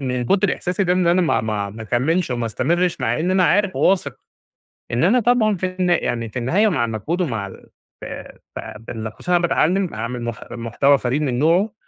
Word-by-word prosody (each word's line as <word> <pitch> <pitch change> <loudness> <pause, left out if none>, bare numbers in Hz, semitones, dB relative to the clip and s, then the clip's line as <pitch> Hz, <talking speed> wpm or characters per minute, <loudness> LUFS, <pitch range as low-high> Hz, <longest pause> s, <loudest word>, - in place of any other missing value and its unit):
من 125 -2 -2
كتر 195 - +2
إحساسي 185 +2 -2
ده 180 - +2
إن 180 -1 +1
أنا 175 +2 +4
ما 165 - +2
ما 105 -2 -2
ما 110 +2 -9
اكملش 135 +8 0
وما 120 -1 -2
استمرش، 175 +9 0
مع - - 0
إن 180 +3 0
أنا 185 -1 +3
عارف 195 +2 +2
وواثق 190 0 +1 0.8
إن 120 +6 +1
أنا 225 +8 +4
طبعًا 220 -3 +3
في 185 +1 -3
الن 180 -1 +2
يعني 115 -9 0
في 125 - -4
النهاية، 185 - +2
مع 130 - +1
المجهود 115 - -3
ومع 110 - -2
ال - - -14 0.3
ف - - -7 0.5
ف - - -4 0.2
بال 110 -1 -6
خصوصًا 180 - -6
إن - - +5
أنا 170 0 +1
باتعلم 180 +4 +1
أعمل 115 +3 -4
مح 120 -2 -4
محتوى 120 +4 +2
فريد 130 +4 -1
من 130 -4 -1
نوعه، 175 +8 +2
160 Hz, 210 wpm, -21 LUFS, 120-185 Hz, 0.8 s, إن